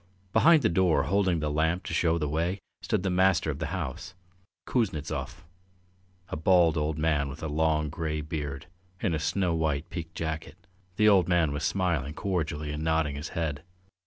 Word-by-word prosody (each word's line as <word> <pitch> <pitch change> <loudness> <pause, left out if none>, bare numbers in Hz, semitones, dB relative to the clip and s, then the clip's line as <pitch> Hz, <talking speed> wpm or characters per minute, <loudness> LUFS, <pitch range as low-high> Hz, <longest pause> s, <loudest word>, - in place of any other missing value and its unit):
Behind 155 +6 +6
the - - +5
door, 90 -1 +3
holding 95 -3 +1
the 75 -1 -1
lamp 80 +4 +1
to - - -5
show 85 -1 +2
the 75 -2 -1
way, 85 +6 -1 0.2
stood - - -1
the 95 - 0
master 90 -3 +3
of 70 - -7
the - - -2
house, 90 - -5 0.5
Kuznetsov, 95 - -2 0.9
a - - -3
bald 85 0 +4
old 75 0 -1
man 75 -3 +1
with 70 - -9
a - - -1
long 75 0 +1
grey 75 -1 -2
beard, 75 -3 -5 0.3
in 95 -6 0
a 80 - 0
snow 90 +3 0
white 80 -2 -1
piqué 85 -2 -5
jacket. 80 +1 -5 0.3
The 105 +2 +4
old 95 -5 +5
man 85 -4 +2
was 75 +1 -3
smiling 80 -7 0
cordially 80 -6 -2
and 75 +1 -4
nodding 80 -3 +1
his 75 +2 -5
head. 75 -3 -2
80 Hz, 180 wpm, -28 LUFS, 75-90 Hz, 0.9 s, Behind